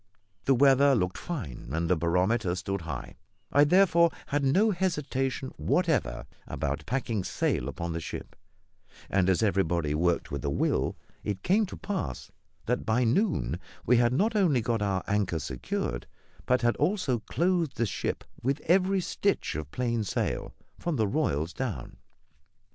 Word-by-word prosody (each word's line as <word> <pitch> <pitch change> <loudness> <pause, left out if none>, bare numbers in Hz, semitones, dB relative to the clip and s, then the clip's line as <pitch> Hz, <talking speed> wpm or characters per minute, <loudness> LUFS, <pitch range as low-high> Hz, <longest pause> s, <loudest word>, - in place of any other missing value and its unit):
The 135 - +4
weather 135 +1 +5
looked 90 -4 -1
fine, 80 - -6
and 85 +1 0
the 90 - +3
barometer 90 +4 +1
stood 95 0 -3
high; 80 0 -6 0.3
I 145 - +6
therefore 170 0 +5 0.2
had 145 0 -1
no 190 +12 +4
hesitation 140 -8 -1
whatever 160 - 0 0.2
about - - -3
packing 115 -5 -1
sail - - -1
upon 85 -1 -4
the 85 - -2
ship; 80 - -7 0.8
and 95 -1 +3
as 95 +4 +2
everybody 85 -7 +1
worked 85 +2 +1
with 70 -1 -4
a 70 - 0
will, 70 - 0 0.3
it 100 -2 -3
came 205 +3 +3
to - - -8
pass 130 - -4 0.3
that - - 0
by 115 +3 +2
noon 125 - +1 0.3
we 125 - +5
had 120 0 +4
not 210 - +1
only 170 - +3
got 115 -1 -1
our 95 -3 0
anchor 100 -4 0
secured, 65 -3 -3 0.4
but 125 0 +2
had 120 0 +3
also 175 - +1
clothed 165 - 0
the 120 - +2
ship 100 - -3 0.2
with 135 +4 0
every 190 +2 +3
stitch 200 +3 -1
of 75 -1 -5
plain 120 +2 -1
sail, 100 - -2 0.2
from 170 -3 -1
the 110 -5 +1
royals 90 - 0
down. 105 - -4
120 Hz, 155 wpm, -28 LUFS, -, 0.8 s, I